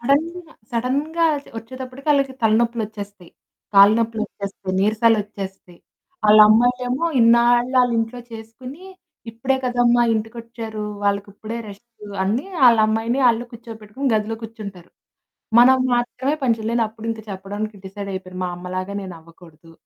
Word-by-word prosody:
సడెన్‌గ, 285 +7 +1 0.4
సడెన్‌గా 285 +8 -1 0.3
ఒచ్చేటప్పటికి 255 +4 -10
వాళ్ళకి 275 -2 +2
తలనొప్పులొచ్చేస్తాయి. 215 -4 -1 0.4
కాళ్ళు 200 +2 +8
నొప్పులొచ్చేస్తాయి, 205 -4 -4
నీరసాలొచ్చేస్తాయి, 205 -4 -1 0.5
ఆళ్ళ 210 +1 +7
అమ్మాయిలేమో 245 +5 +2 0.2
ఇన్నాళ్ళు 240 +2 +4
ఆళ్ళ 245 - +2
ఇంట్లో 225 +2 -3
చేసుకొని, 250 +8 -10 0.5
"ఇప్పుడే 255 +4 -1
కదమ్మా 245 -1 +3
ఇంటి 220 0 -2
కొచ్చారు 230 -2 -7 0.2
వాళ్ళకి 200 0 0
ఇప్పుడే 220 +3 -6
రెస్టు" 210 +1 -14 0.2
అని 215 - 0 0.2
ఆళ్ళ 235 -2 +6
అమ్మాయిని 225 +4 0
ఆళ్ళని 235 +1 0
కూర్చోబెట్టుకొని, 230 +3 -6
గదిలో 215 +1 -1
కూర్చుంటారు. 200 -6 -9 0.7
మనం 260 +2 +7 0.2
మాత్రమే 250 +4 -1
పంచేయ్యాలి 230 -1 +1
అప్పుడు 220 +1 -12
ఇంకా 225 -1 -7
చెప్పడానికి 205 +2 -5
డిసైడ్ 200 +1 -7
అయిపోయాను. 185 -1 -7
మా 180 - -2
అమ్మలాగా 185 +2 -5
నేనవ్వకూడదు, 165 -2 -13
225 Hz, 120 wpm, -21 LUFS, 205-245 Hz, 0.7 s, కాళ్ళు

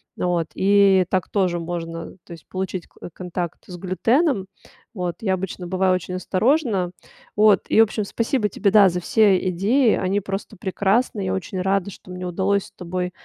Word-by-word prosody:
Вот, 175 -2 0
и 195 -1 +4
так 185 -3 0
тоже 185 -4 0
можно, 165 -1 -5
то - - -17
есть 165 - -14
получить 185 -2 -4
к - - -29 0.2
контакт 175 -1 -5
с 180 - -8
глютеном. 220 - +1 0.5
Вот. 180 -5 -3
Я 195 -4 +1
обычно 185 -1 -4
бываю 185 0 +2
очень 180 0 -5
осторожна. 200 - +1 0.4
Вот. 210 -2 +5
И, - - +3
в - - +10
общем, 215 0 -3
спасибо 230 +2 0
тебе, 200 +1 0
да, 200 -2 +7
за 180 0 -2
все 195 -1 +3
идеи. 215 +7 +2
Они 190 +2 0
просто 195 +2 -5
прекрасны. 200 +4 0
Я 185 - -1
очень 190 0 -3
рада, 195 +1 0
что 185 - -13
мне 180 0 -6
удалось 195 +3 0
с - - -16
тобой 180 0 -4
190 Hz, 175 wpm, -22 LUFS, 180-205 Hz, 0.5 s, в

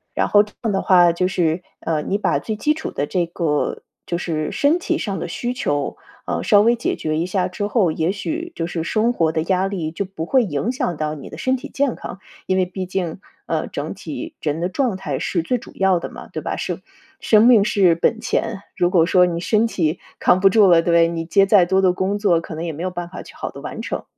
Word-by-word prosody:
然 - - +1
后 205 0 +5
这 210 - -15
样 225 - 0
的 195 - +1
话 175 -2 +6
就 180 +2 0
是， 175 -2 0 0.2
呃， 160 -2 -1
你 200 - -1
把 - - +1
最 220 - -4
基 300 +8 +1
础 315 - -5
的 145 - -2
这 180 -2 0
个 165 -4 -1 0.3
就 170 - -1
是 155 -4 -2
身 315 +1 +2
体 345 -1 -1
上 200 -3 -3
的 - - -4
需 240 +8 -3
求， 145 - -2 0.3
啊， - - -2
稍 205 -2 +5
微 235 +3 +4
解 235 - -2
决 155 0 -2
一 165 - 0
下 185 0 0
之 195 +3 -4
后， 205 -6 +2
也 160 +3 0
许 320 - -4
就 165 - -2
是 170 -2 -3
生 220 +7 +1
活 165 -7 +1
的 160 - -1
压 185 +2 +1
力 175 -6 -3
就 195 +5 -3
不 185 -4 -6
会 260 +3 +4
影 185 - -1
响 180 -10 -2
到 155 0 -2
你 140 - -9
的 - - -8
身 260 0 +1
体 250 - -8
健 275 -3 0
康， 180 - -8 0.3
因 185 - +1
为 185 - +3
毕 185 +1 -5
竟， 180 -2 -3 0.3
呃， - - -1
整 - - -5
体 325 -1 -7
人 155 +1 -2
的 175 - 0
状 230 0 0
态 155 -8 -3
是 175 - -1
最 250 +9 0
主 - - -12
要 190 -2 +3
的 - - -6
嘛， - - -10
对 - - -4
吧？ - - -3
是 - - -4 0.4
生 215 0 +5
命 225 -5 +6
是 190 -5 +4
本 220 +7 +1
钱， 225 -3 -1 0.2
如 175 - +3
果 170 -4 +4
说 180 -1 +5
你 170 -1 -2
身 215 +5 +2
体 165 -6 -1 0.2
扛 180 - +4
不 195 - +5
住 205 0 +5
了， 170 -2 +6
对 - - -14
不 - - +6
对？ 165 0 +5
你 165 -1 -3
接 195 +4 +4
再 195 -3 +6
多 190 +2 +2
的 185 -1 +4
工 190 +3 -1
作 190 -5 +3
可 165 - -8
能 160 - -5
也 165 - -2
没 160 +4 -6
有 185 - -2
办 175 -1 -5
法 180 - -8
去 - - -14
好 - - -4
地 - - -10
完 - - -6
成。 - - -4
185 Hz, 280 characters per minute, -21 LUFS, 170-210 Hz, 0.4 s, 话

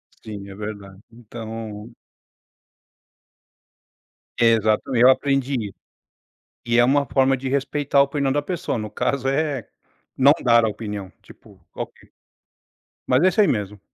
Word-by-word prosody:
Sim, 100 -2 -9
é 95 - -10
verdade, 100 -2 -8
então 115 -1 -8 2.5
Exatamente, 115 +2 +3
eu 130 - +8
aprendi 135 0 +1
isso. 95 - -18 0.9
E 120 0 +2
é 120 - +6
uma 140 +2 +2
forma 135 +2 +2
de 130 +1 -5
respeitar 140 +1 0
a 140 - +8
opinião 140 -1 0
da 145 +1 0
pessoa, 175 -3 -3
no 110 -2 -5
caso 135 -1 -1
é, 140 -3 -1 0.5
não 135 +2 +6
dar 115 -2 +5
a - - +2
opinião, 105 -3 -6
tipo, - - -18
qual - - -4
que - - -24 1.0
mas 130 +5 +3
é 185 - +6
isso 190 - -3
aí 205 - +4
mesmo. 105 -2 -2
120 Hz, 140 wpm, -22 LUFS, 110-140 Hz, 2.5 s, eu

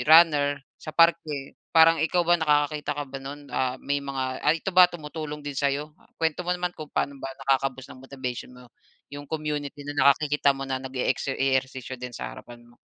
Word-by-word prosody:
runner 145 -4 +6 0.2
sa - - -11
parke. 160 -4 +2 0.2
Parang 165 0 +7
ikaw 175 +3 +2
ba 175 +1 +4
nakakakita 150 -1 +1
ka 145 - -2
ba 135 0 -8
no'n, 140 +1 -9
ah, 130 -1 0
may 145 0 0
mga 135 -2 -3
ay 165 +1 +2
ito 195 - -1
ba 180 0 +8
tumutulong 150 -3 -7
din 145 - -4
sa'yo? 145 +2 -1
Ah, - - -24
kuwento 160 +1 0
mo 180 0 -1
naman 180 0 -2
kung 155 -3 -9
paano 140 -1 -2
ba 135 - -4
nakaka-boost 135 -1 -1
ng 130 - -14
motivation 130 -2 -6
mo 125 -1 -16 0.4
yung 145 0 -8
community 150 -2 -4
na 145 - -4 0.2
nakikita 140 -1 +3
mo 135 - -4
na 130 -1 -3
nage-exer 130 +1 -2
ehersisyo 130 -1 -1
din 125 -2 -6
sa - - -5
harapan 120 0 -12
mo. 120 0 -22
145 Hz, 195 wpm, -26 LUFS, 135-155 Hz, 0.4 s, ba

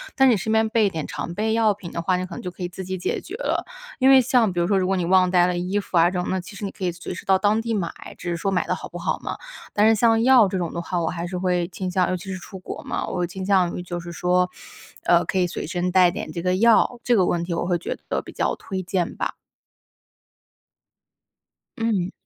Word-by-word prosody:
但 265 -1 +5
你 225 - +3
身 220 +2 -2
边 220 0 +3
备 220 -2 +3
点 160 -5 -4
常 170 - -5
备 220 +3 0
药 220 -1 +3
品 190 -4 -10
的 170 - -3
话， 185 +2 +1
你 180 0 -2
可 185 - -10
能 - - -6
就 180 - -4
可 180 +1 -9
以 175 - -2
自 185 +1 -7
己 185 +1 -3
解 180 - -2
决 380 - -8
了。 - - -1 0.3
因 260 0 +5
为 265 -1 +8
像 240 -5 +2
比 175 - 0
如 170 - +1
说 195 0 +3
如 185 - 0
果 195 - +1
你 180 - 0
忘 185 +1 +4
带 180 -1 +4
了 180 -1 -1
衣 185 +4 -1
服 185 - -2
啊 170 +1 +6
这 180 -1 -2
种， 185 +1 -2
其 185 +3 -12
实 205 - -8
你 195 - -3
可 190 - -5
以 175 - 0
随 175 +1 -7
时 180 - -9
到 190 -1 +4
当 210 +3 +2
地 230 0 -2
买， 185 -6 -1 0.3
只 175 - -5
是 170 - -1
说 195 - -1
买 185 - +1
得 - - 0
好 - - -6
不 - - -9
好 - - -2
嘛。 - - -5 0.4
但 210 +1 +4
是 225 - +5
像 225 +1 +3
药 250 -4 +6
这 190 0 -2
种 175 -3 -2
的 170 - -3
话， 175 0 -2
我 165 - 0
还 170 0 -4
是 180 +1 -4
会 180 -1 0
倾 185 0 -5
向 180 0 +2
尤 185 - 0
其 185 +2 -7
是 185 - -5
出 190 +2 -10
国 185 - -7
嘛， - - -2
我 180 -1 -1
倾 190 +2 -6
向 185 -3 +2
于 180 - -5
就 175 -1 -5
是 175 0 -8
说， 180 +2 +1 0.5
呃， 175 0 +4
可 - - -2
以 180 - +3
随 170 - -5
身 180 0 -1
带 180 -1 +5
点 - - -6
这 170 - -4
个 180 +1 +1
药， 230 +3 +4
这 245 - +3
个 190 -4 +4
问 170 -1 0
题 170 0 -3
我 170 - -1
会 175 -1 +1
觉 170 - -5
得 - - 0
比 - - -11
较 - - -1
推 190 -1 -5
荐 180 -1 -1
吧。 - - -2 2.4
嗯。 205 -5 0
185 Hz, 300 characters per minute, -23 LUFS, 175-205 Hz, 2.4 s, 为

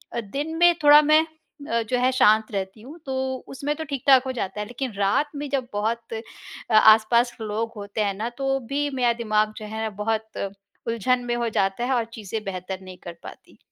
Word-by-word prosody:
दिन 275 +8 -4
में 345 +1 +6
थोड़ा 295 +1 +9
मैं 305 +1 +5
अ, 310 -6 -5
जो 250 - +1
है 255 +1 +3
शांत 220 -3 +4
रहती 195 +1 -4
हूँ, 285 +8 -11
तो 265 -1 -2
उसमें 285 +2 -3
तो 320 - -5
ठीक-ठाक 275 -3 +3
हो 260 - -2
जाता 210 -5 -4
है 210 - -2
लेकिन 245 +1 -5
रात 205 +9 +2
में 290 0 -4
जब 270 -3 -1
बहुत 225 +3 -2
अ, 225 0 -9
आस-पास 225 +3 +5
लोग 220 +1 -2
होते 205 +1 -4
हैं 200 -1 0
ना 215 +4 -3
तो 270 0 0
भी 290 +1 0
मेरा 245 -2 +2
दिमाग 215 -1 +1
जो 215 - -7
है 220 +1 -5
ना 220 - -1
बहुत 220 0 -2 0.5
उलझन 245 +2 +1
में 240 0 -1
हो 235 -1 -1
जाता 195 +1 0
है 265 - 0
और 235 -3 +1
चीज़ें 220 -1 -5
बेहतर 190 -1 -5
नहीं 185 -1 -11
कर 175 - -7
पाती। - - -13
235 Hz, 205 wpm, -24 LUFS, 215-270 Hz, 0.5 s, थोड़ा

